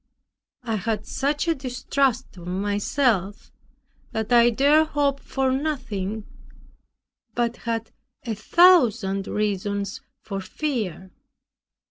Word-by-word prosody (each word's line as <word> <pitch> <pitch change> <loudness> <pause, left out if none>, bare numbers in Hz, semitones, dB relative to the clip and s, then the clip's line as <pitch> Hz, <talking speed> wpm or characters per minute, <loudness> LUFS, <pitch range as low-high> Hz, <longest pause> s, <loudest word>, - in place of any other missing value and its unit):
I 225 -3 -1
had 215 +1 -2
such 290 +4 -1
a 330 - +4
distrust 260 -2 -1
of 175 -1 -11
myself, 205 +2 0 0.6
that 220 +1 -1
I 240 0 +7
dared 290 +6 +4
hope 285 -2 0
for 265 -1 -1
nothing, 225 -8 -3 1.1
but 235 0 0
had 230 -1 -3 0.3
a 230 - -2
thousand 220 - +4
reasons 200 +2 -2 0.2
for 195 -2 -4
fear. 190 - -3
230 Hz, 100 wpm, -24 LUFS, 205-270 Hz, 1.1 s, I